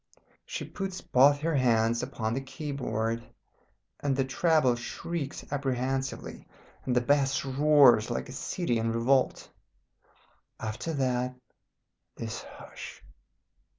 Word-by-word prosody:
She -, -, -4 dB
puts 195 Hz, -2 st, -5 dB
both 145 Hz, +3 st, +4 dB
her 165 Hz, +1 st, 0 dB
hands 115 Hz, -4 st, +3 dB
upon 110 Hz, 0 st, -3 dB
the 135 Hz, -, -1 dB
key 145 Hz, +2 st, -6 dB
board, 115 Hz, -4 st, -2 dB, 0.8 s
and 140 Hz, -2 st, 0 dB
the 135 Hz, 0 st, +1 dB
treble 150 Hz, -1 st, +3 dB
shrieks 145 Hz, +5 st, -5 dB
apprehensively, 135 Hz, -1 st, -2 dB, 0.4 s
and 125 Hz, -, 0 dB
the 125 Hz, -, +4 dB
bass 140 Hz, +1 st, +2 dB
roars 135 Hz, -5 st, +5 dB
like 120 Hz, -, -2 dB
a -, -, -9 dB
city 130 Hz, -1 st, -1 dB
in 115 Hz, 0 st, 0 dB
revolt. 125 Hz, +3 st, +2 dB, 1.1 s
After 110 Hz, +8 st, -4 dB
that 125 Hz, -2 st, 0 dB, 0.8 s
this 115 Hz, -1 st, -5 dB
hush. -, -, -11 dB
130 Hz, 120 wpm, -29 LUFS, 120-145 Hz, 1.1 s, roars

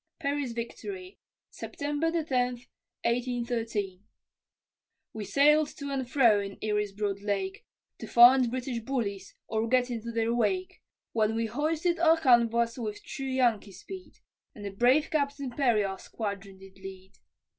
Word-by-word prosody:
PERRY'S 280 Hz, -4 st, -2 dB
VICTORY 365 Hz, -, -7 dB, 0.3 s
[September 295 Hz, +2 st, -2 dB
10, 335 Hz, 0 st, 0 dB, 0.8 s
1813] 235 Hz, -5 st, -1 dB, 1.1 s
We 220 Hz, -, -5 dB
sailed 300 Hz, +6 st, +4 dB
to 280 Hz, -1 st, -5 dB
and 265 Hz, -3 st, -3 dB
fro 235 Hz, -6 st, +5 dB
in 200 Hz, -1 st, -5 dB
Erie's 210 Hz, -1 st, 0 dB
broad 200 Hz, -1 st, -3 dB
lake, 380 Hz, -, -2 dB, 0.4 s
To -, -, -7 dB
find 245 Hz, +1 st, +7 dB
British 250 Hz, 0 st, -3 dB
bullies 215 Hz, -6 st, -3 dB
or 220 Hz, 0 st, -1 dB
get 250 Hz, +1 st, +2 dB
into 235 Hz, 0 st, -4 dB
their 230 Hz, 0 st, 0 dB
wake, 365 Hz, -, -1 dB, 0.3 s
When 220 Hz, -1 st, +1 dB
we 230 Hz, 0 st, 0 dB
hoisted 315 Hz, +8 st, 0 dB
our 325 Hz, -1 st, +5 dB
canvas 235 Hz, -3 st, +3 dB
with 210 Hz, -3 st, -5 dB
true 270 Hz, -, -6 dB
Yankee 240 Hz, -6 st, +1 dB
speed, 375 Hz, -, -10 dB, 0.4 s
And 205 Hz, -, -9 dB
the 200 Hz, -, -4 dB
brave 255 Hz, -, +3 dB
Captain 280 Hz, -3 st, -1 dB
Perry 240 Hz, -5 st, +2 dB
our 190 Hz, -1 st, -4 dB
squadron 200 Hz, -3 st, -6 dB
did 190 Hz, 0 st, -15 dB
lead. 190 Hz, 0 st, -10 dB
240 Hz, 140 wpm, -29 LUFS, 210-280 Hz, 1.1 s, find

